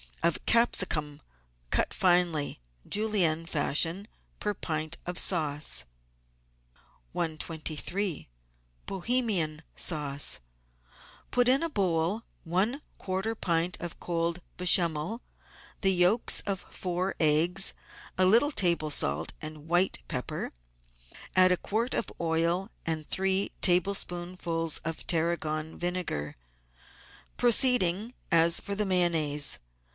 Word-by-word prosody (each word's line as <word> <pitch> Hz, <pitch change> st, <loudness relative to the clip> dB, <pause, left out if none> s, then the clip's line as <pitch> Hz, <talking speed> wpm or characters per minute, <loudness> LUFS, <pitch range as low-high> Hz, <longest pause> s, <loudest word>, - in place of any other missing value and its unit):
of 170 Hz, -1 st, +1 dB
capsicum 160 Hz, -10 st, +1 dB, 0.5 s
cut -, -, 0 dB
finely. 175 Hz, -, +1 dB, 0.3 s
Julienne 195 Hz, -7 st, +1 dB
fashion, 165 Hz, +5 st, +1 dB, 0.3 s
per 210 Hz, -, -1 dB
pint 155 Hz, -3 st, -4 dB
of 180 Hz, 0 st, -4 dB
sauce. 145 Hz, -, +1 dB, 1.3 s
123— 165 Hz, +3 st, -3 dB, 0.6 s
BOHEMIAN 195 Hz, -7 st, +1 dB
SAUCE 145 Hz, -4 st, -1 dB, 0.9 s
Put 245 Hz, -1 st, +3 dB
in 265 Hz, +2 st, +4 dB
a 335 Hz, -, -1 dB
bowl 190 Hz, -, 0 dB, 0.2 s
one 195 Hz, -, 0 dB, 0.2 s
quarter 190 Hz, +4 st, -3 dB
pint 170 Hz, -3 st, -1 dB
of 175 Hz, -1 st, -6 dB
cold 170 Hz, 0 st, -2 dB, 0.2 s
Bechamel, 175 Hz, +3 st, +3 dB, 0.6 s
the 195 Hz, -, +3 dB
yolks 180 Hz, +6 st, +3 dB
of 195 Hz, -2 st, -3 dB
four 180 Hz, +1 st, -3 dB
eggs, 165 Hz, +5 st, +3 dB, 0.4 s
a 185 Hz, -, +3 dB
little 235 Hz, +10 st, +4 dB
table 170 Hz, -, +1 dB
salt 80 Hz, -, +1 dB
and 155 Hz, 0 st, -7 dB
white 175 Hz, -, +2 dB
pepper. -, -, -4 dB, 0.8 s
Add 185 Hz, 0 st, +6 dB
a 180 Hz, -, +2 dB
quart 230 Hz, +8 st, -2 dB
of 215 Hz, -, -2 dB
oil 170 Hz, +4 st, 0 dB, 0.2 s
and 160 Hz, -2 st, -2 dB
three 190 Hz, +1 st, 0 dB
tablespoonfuls 175 Hz, -3 st, 0 dB
of 165 Hz, 0 st, -4 dB
tarragon 160 Hz, -2 st, -1 dB
vinegar, 175 Hz, -, -3 dB, 1.0 s
proceeding 240 Hz, -4 st, +4 dB, 0.2 s
as 170 Hz, 0 st, +5 dB
for 200 Hz, -, -6 dB
the 210 Hz, +1 st, -1 dB
Mayonnaise. 165 Hz, -6 st, +3 dB
175 Hz, 100 wpm, -28 LUFS, 160-195 Hz, 1.3 s, Add